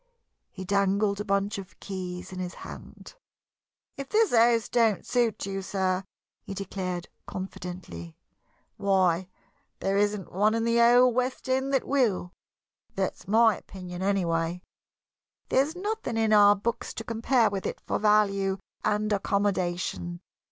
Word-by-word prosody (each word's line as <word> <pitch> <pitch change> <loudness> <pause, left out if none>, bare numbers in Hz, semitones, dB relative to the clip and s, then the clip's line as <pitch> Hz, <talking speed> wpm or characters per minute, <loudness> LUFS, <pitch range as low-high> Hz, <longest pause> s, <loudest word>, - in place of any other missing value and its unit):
He 185 - -8
dangled 200 +1 +1
a - - -2
bunch 200 +1 0
of 190 -3 -12
keys 180 -2 -6
in 185 - -6
his 180 -1 -4
hand. - - -11 0.8
"If 275 -1 -6
this 440 - +3
house 230 -1 +4
don't 225 -5 +2
suit 240 -5 0
you, 195 0 -3
sir," 190 -1 -1 0.4
he 195 - -7
declared, 185 -2 -4 0.2
confidently, 180 - -7 0.6
"why, 190 -3 +2 0.5
there 195 +1 0
isn't 205 -2 0
one 210 +4 +2
in 230 - 0
the 230 0 +2
whole 245 +1 +6
west 255 +2 -1
end 265 +1 0
that 270 - +2
will. 230 -10 +1 0.6
That's 190 -2 -3
my 220 +1 +5
opinion, 180 -2 -9
anyway. 175 -3 0 0.9
There's 285 +5 +2
nothing 410 - -3
in 220 -1 +2
our 205 -1 +7
books 220 +4 -3
to 225 - -5
compare 230 0 +2
with 195 -1 -3
it - - -5
for - - -2
value 200 -2 +3 0.3
and 210 0 +1
accommodation. 185 -3 -1
200 Hz, 135 wpm, -27 LUFS, 185-230 Hz, 0.9 s, our